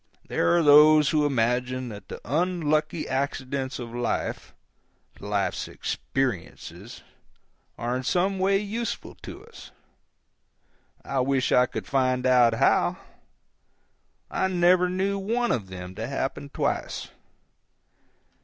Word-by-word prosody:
There 85 - +2
are 170 - +3
those 150 0 +7
who 150 -2 +2
imagine 125 0 0
that 105 -2 -10
the - - -8
unlucky 155 +1 0
accidents 135 0 -2
of 120 -2 -7
life—life's 105 -3 -4
"experiences"—are 120 - -6
in - - -3
some 185 +8 0
way 195 +1 +3
useful 215 +3 -4
to - - -10
us. 460 - -13 1.4
I 135 - -1
wish 130 0 +1
I 125 0 +5
could - - -6
find 130 -2 0
out 125 -3 +5
how. - - +2 1.3
I 190 - 0
never 180 0 +3
knew 195 +2 -1
one 230 +5 0
of 105 -5 -1
them 90 -1 -8
to 110 +4 -5
happen 135 +1 -3
twice. - - -3
135 Hz, 110 wpm, -26 LUFS, 125-175 Hz, 1.4 s, those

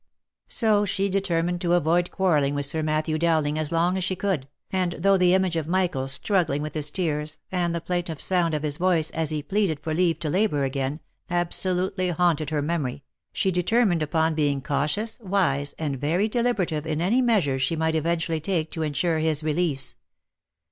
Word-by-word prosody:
So 215 -3 +3
she 200 0 0
determined 175 -2 0
to 175 -2 +1
avoid 175 +1 +2
quarrelling 150 -7 +1
with 145 0 0
Sir 155 +3 -1
Matthew 155 0 0
Dowlin<£ 155 -3 +1
as 155 0 -2
long 170 +3 +1
as 190 - -1
she 185 +1 -1
could, 185 -8 -2 0.2
and 185 -2 0
though 195 +4 +3
the 180 -1 +4
image 190 -3 +1
of 160 -2 -2
Michael 175 -7 0
struggling 150 0 0
with 155 - -5
his 150 -1 0
tears, 155 -3 -2
and 175 -2 0
the 170 - -3
plaintive 175 -3 -3
sound 175 -4 +1
of 150 - -3
his 150 -1 -1
voice 170 -3 +2
as 160 -2 -1
he 155 -2 -1
pleaded 190 -2 0
for 155 +1 -3
leave 170 -1 +2
to 155 - -2
labour 185 -7 +1
again, 135 +2 -2 0.3
absolutely 180 +2 0
haunted 165 -3 +1
her 150 -2 -1
memory, 145 -5 -2 0.3
she 190 - 0
determined 180 0 +2
upon 160 +1 +1
being 145 -3 +1
cautious, 150 - -1
wise, 180 - 0
and 140 -5 -3
very 170 +8 +1
deliberative 210 -10 -1
in 155 -1 -1
any 205 +10 +2
measures 185 - +2
she 165 - +1
might 160 0 0
eventually 165 +1 0
take 165 -2 -1
to 160 - -4
ensure 160 +2 0
his 155 -1 0
release. 155 -3 0
165 Hz, 185 wpm, -25 LUFS, 150-185 Hz, 0.3 s, the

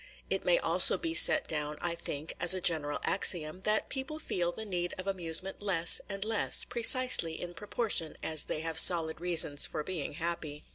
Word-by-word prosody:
It - - -2
may - - +2
also - - +3
be 330 -1 -5
set 310 -2 +6
down, 150 -1 -4
I 170 -1 -3
think, 160 -2 -7
as 175 +1 +1
a - - -3
general 155 -5 -1
axiom, 175 -2 -1
that 215 0 0
people 275 +3 -5
feel 175 - -3
the 220 +5 -8
need 175 -3 -5
of 185 - -7
amusements 185 0 -1
less 175 -5 +3
and 200 0 -5
less, 220 -1 +3
precisely 235 -8 +3
in 175 0 -8
proportion 200 -2 -4
as 155 -2 0
they 155 - -5
have 160 0 0
solid 165 -2 +4
reasons 165 -5 +1
for 155 - -6
being 165 -5 -5
happy. 160 -2 -5
175 Hz, 185 wpm, -29 LUFS, 160-200 Hz, -, set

